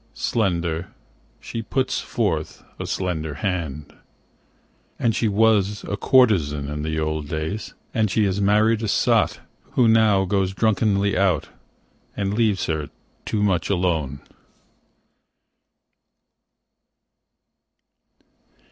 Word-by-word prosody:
Slender, 85 -5 -1 0.5
she 115 - -5
puts 130 +4 -1
forth - - -2 0.2
a - - -4
slender 80 -5 -2
hand, 75 -4 -3 1.0
And 115 -3 +1
she 115 - +1
was 105 -1 +2
a 100 - -3
courtezan 85 - +3
in 75 0 -4
the 80 +1 -2
old 80 -1 -2
days, 80 +8 -4 0.2
And 110 -2 +1
she 105 +3 +2
has 100 +1 0
married 105 +2 +3
a 110 - -2
sot, - - +2 0.3
Who 125 - +4
now 110 -3 +4
goes 95 0 0
drunkenly 100 -2 +1
out 95 -1 +1 0.7
And 100 0 -1
leaves 105 -4 +1
her 80 -2 -2 0.4
too 105 -1 -1
much 95 -4 +1
alone. 80 -8 0
95 Hz, 105 wpm, -23 LUFS, 80-110 Hz, 1.0 s, Who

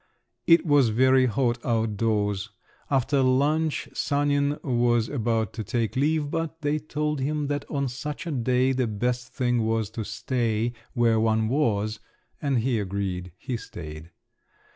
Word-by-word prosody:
It 165 +1 +6
was 145 -6 +4
very 130 +3 +4
hot 120 0 0
out 115 -2 +1
of 105 - -6
doors; 105 -2 0 0.4
after 135 0 +2
lunch 145 +5 +1
Sanin 145 0 +1
was 120 -3 +2
about 115 -5 -1
to 110 - -4
take 115 +2 -1
leave, 145 +2 +1
but 165 -1 -3
they 145 +1 +1
told 150 0 -2
him 150 +2 -1
that 145 -1 -2
on 140 -2 -1
such 145 +7 -5
a 170 - -3
day 130 0 +2
the 130 -2 0
best 125 +4 -2
thing 120 -3 +1
was 110 -1 0
to 115 0 -4
stay 115 0 -1 0.2
where 115 -2 +3
one 110 0 +2
was, 110 -6 0 0.4
and 140 -3 +1
he 120 -1 +1
agreed; 95 -2 -3
he 125 +4 -4
stayed. 80 -6 -9
125 Hz, 155 wpm, -26 LUFS, 110-145 Hz, 0.4 s, It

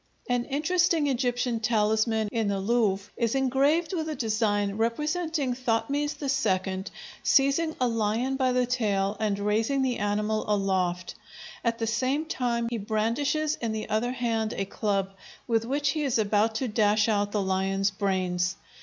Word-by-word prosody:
An 245 -1 0
interesting 325 +2 +1
Egyptian 245 -3 0
talisman 220 0 +1
in 225 -3 0
the 200 -1 0
Louvre 205 -2 0
is 235 +1 0
engraved 275 +7 +2
with 320 -3 -2
a 310 - -3
design 210 -4 0
representing 300 +4 -1
Thothmes 260 +4 -1 0.5
II 190 0 -4 0.4
seizing 285 +4 +3
a 250 - +2
lion 230 +3 0
by 260 -1 +1
the 250 0 +2
tail 205 -5 0
and 210 -2 0
raising 220 +7 +1
the 255 -2 -1
animal 210 +1 0
aloft; 185 -3 0 0.5
at 230 -1 0
the 225 - -1
same 260 +7 0
time 240 -6 -1
he 235 - -2
brandishes 235 +9 0
in 230 -2 -1
the 215 0 -4
other 220 +3 0
hand 230 -3 -1
a 195 - -2
club, 195 -1 -1 0.3
with 225 -2 +1
which 280 +3 0
he 310 +2 -1
is 275 -5 +1
about 215 +1 +2
to 255 +3 -1
dash 215 0 +2
out 205 -2 +1
the 210 - 0
lion's 195 +1 0
brains. 185 -3 -1
225 Hz, 155 wpm, -27 LUFS, 205-265 Hz, 0.5 s, seizing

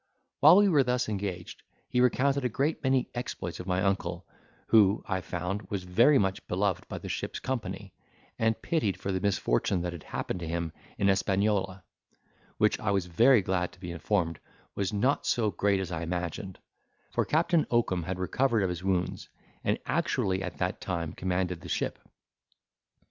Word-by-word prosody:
While 155 +4 +8
we 205 0 +6
were 155 -7 +5
thus 125 0 0
engaged, 100 -4 -4 0.3
he 125 - +1
recounted 135 +3 +2
a 125 - +1
great 140 +7 -1
many 130 -2 +1
exploits 120 -8 -5
of 90 - -7
my 90 0 +1
uncle, 95 -3 -1 0.4
who, 105 -2 +5
I 95 -1 -1
found, 90 +4 -4
was 100 -3 -3
very 115 +11 +5
much 95 -4 -1
beloved 95 -1 -1
by - - -5
the - - -7
ship's - - -3
company, 100 -6 -4 0.5
and 110 -1 +1
pitied 105 - -1
for 100 - -3
the 95 -1 -1
misfortune 90 -2 +1
that 90 0 -3
had 85 - -8
happened 90 - -4
to 85 - -5
him 85 0 -2 0.3
in 100 - +2
Hispaniola, 95 -1 +1 0.7
which - - +2
I - - -1
was 100 -3 +1
very 115 +6 +5
glad 90 -1 -1
to - - -18
be 90 -2 -6
informed 85 -1 -1 0.3
was 100 -2 -1
not 125 +7 +1
so 110 -3 +2
great 100 -1 +1
as 95 -2 -4
I 80 -1 -3
imagined; 90 +3 -4 0.5
for - - +1
Captain 165 +1 +2
Oakum 115 -7 +1
had 90 +3 -4
recovered 115 +4 +1
of 95 - +1
his 90 0 -4
wounds, 95 -2 -1 0.3
and - - +1
actually 95 -1 0
at - - -5
that - - -2
time 85 -4 -3
commanded 90 -1 -2
the - - -9
ship. - - -2
95 Hz, 175 wpm, -29 LUFS, 90-115 Hz, 0.7 s, While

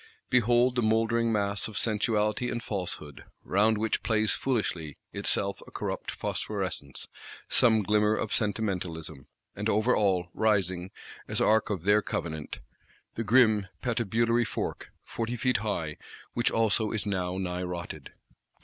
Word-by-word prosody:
Behold 120 +1 +4
the 125 - +2
mouldering 115 +1 +2
mass 100 -1 +1
of 110 - -7
Sensuality 110 +1 +1
and 120 - -3
Falsehood; 85 -7 -5 0.2
round 105 +3 +3
which 110 0 0
plays 110 -1 +1
foolishly, 90 - -2 0.2
itself 100 0 -1
a - - -10
corrupt - - -4
phosphorescence, 95 -9 -4 0.4
some 110 -3 +4
glimmer 105 +1 +3
of 110 - -2
Sentimentalism;—and 95 -3 -3
over 110 +4 +3
all, 95 -4 +1
rising, 95 -4 +1 0.4
as - - -1
Ark 110 0 +3
of 95 -6 -2
their 105 +2 +4
Covenant, 80 -6 -4 0.5
the 115 - -3
grim 110 -3 +4 0.2
Patibulary 115 0 +1
Fork - - -4
"forty 115 +1 -3
feet 125 +2 +2
high;" 85 -8 -3 0.4
which 120 - +2
also 110 -1 +2
is 110 -3 -2
now 95 -3 -1
nigh 90 -1 -2
rotted. 85 -5 -6
105 Hz, 130 wpm, -28 LUFS, 95-115 Hz, 0.5 s, Behold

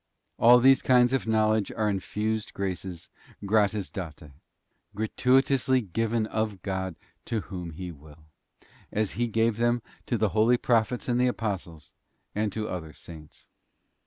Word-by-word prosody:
'f - - -31
All 120 +1 +8
these 135 +2 +5
kinds 125 0 +4
of 135 -3 0
knowledge 110 -1 +2
are 110 - 0
infused 105 +2 -2
graces 95 -3 -4 0.4
gratis 105 -1 +1
date, 80 -5 -7 0.6
gra 110 +2 -1
tuitously 130 -5 +2
given 115 0 +1
of 110 -4 -3
God 95 -2 -3 0.3
to 115 -2 -2
whom 90 -3 -7
He 90 +3 -7
will, 75 0 -16 0.7
as 105 -2 0
He 120 +4 -1
gave 115 0 +1
them 120 0 +1 0.2
to 120 - 0
the 110 -1 +1
holy 110 +5 +3
Prophets 120 0 +1
and 125 0 +1
the 125 - +4
Apostles, 95 - -4 0.4
and 105 0 -1
to 110 +1 -3
other 80 -5 -6
Saints. 80 -3 -13
110 Hz, 150 wpm, -27 LUFS, 95-115 Hz, 0.7 s, All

